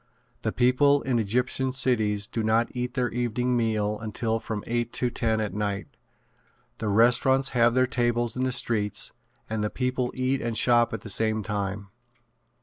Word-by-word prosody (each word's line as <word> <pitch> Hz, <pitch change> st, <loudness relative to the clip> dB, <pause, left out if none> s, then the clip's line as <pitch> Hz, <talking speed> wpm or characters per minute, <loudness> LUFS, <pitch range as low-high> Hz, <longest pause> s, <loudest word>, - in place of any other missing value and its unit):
The -, -, -1 dB
people 140 Hz, +3 st, +3 dB
in 125 Hz, -3 st, +1 dB
Egyptian 125 Hz, +4 st, 0 dB
cities 110 Hz, -6 st, +1 dB
do 115 Hz, -, -3 dB
not 110 Hz, +2 st, +2 dB
eat 125 Hz, +1 st, -3 dB
their 125 Hz, -2 st, 0 dB
evening 120 Hz, +1 st, -1 dB
meal 110 Hz, -3 st, 0 dB
until 110 Hz, +1 st, -2 dB
from 110 Hz, -2 st, -5 dB
eight 120 Hz, 0 st, -1 dB
to 125 Hz, -1 st, 0 dB
ten 110 Hz, -2 st, 0 dB
at 105 Hz, -3 st, -2 dB
night. 100 Hz, -1 st, -3 dB, 0.9 s
The 110 Hz, -, -2 dB
restaurants 125 Hz, +5 st, +4 dB
have 120 Hz, -1 st, +3 dB
their 130 Hz, 0 st, +4 dB
tables 120 Hz, -1 st, 0 dB
in 130 Hz, -, -1 dB
the 130 Hz, -, 0 dB
streets 105 Hz, -4 st, -1 dB, 0.4 s
and 110 Hz, -1 st, -2 dB
the 105 Hz, -, 0 dB
people 125 Hz, 0 st, -1 dB
eat 130 Hz, +1 st, 0 dB
and 115 Hz, -1 st, -2 dB
shop 120 Hz, -1 st, +4 dB
at 115 Hz, -, -4 dB
the 105 Hz, -, -9 dB
same 110 Hz, +1 st, 0 dB
time. 100 Hz, 0 st, -3 dB
120 Hz, 170 wpm, -26 LUFS, 110-125 Hz, 0.9 s, restaurants